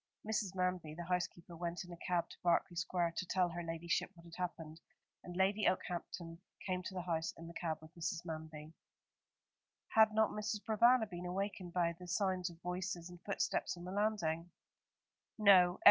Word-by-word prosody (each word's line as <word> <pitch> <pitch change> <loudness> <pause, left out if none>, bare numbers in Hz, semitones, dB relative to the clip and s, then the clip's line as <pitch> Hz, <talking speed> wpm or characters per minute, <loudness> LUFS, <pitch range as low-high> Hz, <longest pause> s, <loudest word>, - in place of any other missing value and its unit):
Mrs. 210 -3 -1
Manby, 180 -4 -1
the 175 - -5
housekeeper, 175 -1 -2
went 170 +1 -3
in 175 - -11
a - - -9
cab 175 -1 0
to - - -11
Berkeley 175 +1 +2
Square 170 0 0
to - - -1
tell 180 -1 +2
her 175 +1 -4
ladyship 165 0 -1
what 170 - -15
had 170 - -13
happened, 165 -3 -5 0.4
and 175 0 -7
Lady 195 +2 +3
Okehampton 170 -2 -2 0.3
came 185 -1 0
to 190 +1 -6
the 180 - -2
house 165 -2 -1
in 165 - -9
the 170 - -8
cab 165 -2 -2
with 155 +1 -13
Mrs. 175 +1 -3
Manby." 155 -1 -6 1.2
"Had 220 -1 +6
not 220 0 +3
Mrs. 210 0 -2
Provana 230 +1 +5
been 180 -1 -6
awakened 185 -1 -3
by 170 -2 +2
the 180 - -9
sounds 185 +1 +1
of 170 -1 -13
voices 180 -1 -3
and 175 0 -12
footsteps 200 -2 -1
on 175 - -8
the 180 - -5
landing?" 185 -5 0 0.9
"No. 190 -4 +7
180 Hz, 180 wpm, -37 LUFS, 170-190 Hz, 1.2 s, No